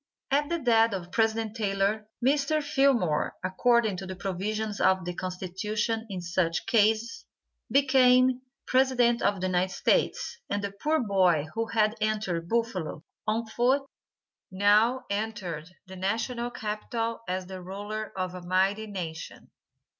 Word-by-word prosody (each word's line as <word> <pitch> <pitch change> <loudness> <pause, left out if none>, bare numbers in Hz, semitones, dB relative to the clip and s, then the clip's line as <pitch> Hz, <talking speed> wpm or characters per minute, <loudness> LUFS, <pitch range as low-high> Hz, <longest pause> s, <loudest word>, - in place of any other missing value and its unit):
At 290 +2 +2
the 340 - 0
death 230 -6 +3
of 180 -2 -5
President 225 0 0
Taylor, 205 0 0 0.2
Mr. 290 +2 +2
Fillmore, 270 - +2
according 220 +2 +2
to 190 0 -6
the 185 - -5
provisions 205 +3 -3
of 190 -2 +3
the 180 - -3
Constitution 210 +5 -3
in 185 -2 -4
such 170 -1 -1
cases, 220 +1 +2 0.5
became 255 -2 +4 0.2
President 255 -2 +3
of 200 -2 +1
the 185 - -2
United 185 0 +1
States, 470 - 0
and 205 0 -1
the 200 - -2
poor 300 +11 0
boy 185 -8 +3
who 225 0 -1
had 215 -2 +2
entered 205 -6 -1
Buffalo 200 -9 -2 0.2
on 225 +2 0
foot 245 +5 +1 0.7
now 210 +6 +3
entered 195 -7 -3 0.2
the 190 0 -10
National 230 +5 -2
Capitol 230 0 -3
as 185 +1 -2
the 185 0 -8
ruler 205 +3 -5
of 185 -1 -2
a 180 - -7
mighty 190 +4 +1
nation. 170 -6 -7
215 Hz, 140 wpm, -28 LUFS, 185-235 Hz, 0.7 s, became